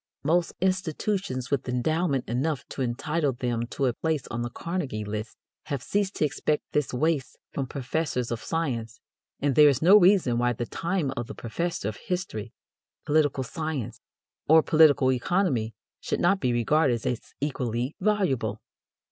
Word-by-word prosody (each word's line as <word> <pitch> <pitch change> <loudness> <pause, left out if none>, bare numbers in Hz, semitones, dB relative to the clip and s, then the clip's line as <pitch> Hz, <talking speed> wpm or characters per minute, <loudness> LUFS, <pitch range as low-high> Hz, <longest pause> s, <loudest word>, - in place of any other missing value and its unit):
Most 170 +4 +2
institutions 185 - -1
with 135 -2 0
endowment 140 +2 0
enough 135 +4 -1
to - - -5
entitle 140 +4 0
them 120 -1 -2
to 135 - -2
a 125 - +2
place 155 0 -2
on 120 - -3
the 120 - -2
"Carnegie 135 - -4
list" 105 +2 -5 0.3
have 140 -5 -3
ceased 200 -1 -1
to - - +2
expect 150 +1 -1
this 150 -3 0
waste 145 0 0
from 135 -2 -3
professors 130 -2 -2
of 115 - -3
science, 120 -9 -3 0.4
and 140 -1 +2
there 150 +3 +7
is 140 -2 +1
no 190 +7 +7
reason 180 -11 +4
why 120 0 +2
the 120 +1 -3
time 165 0 -1
of 120 -1 -4
the 140 - -8
professor 165 - -3
of 110 - -4
history, 120 - -4 0.5
political 145 -3 +2
science, 155 -1 -4 0.5
or 160 +1 +7
political 150 -5 +5
economy 130 - 0 0.2
should - - -2
not 190 +3 +3
be 125 -6 +1
regarded 120 +1 +2
as 125 - -3
equally 125 -2 -2
valuable. 145 - 0
140 Hz, 155 wpm, -26 LUFS, 120-160 Hz, 0.5 s, there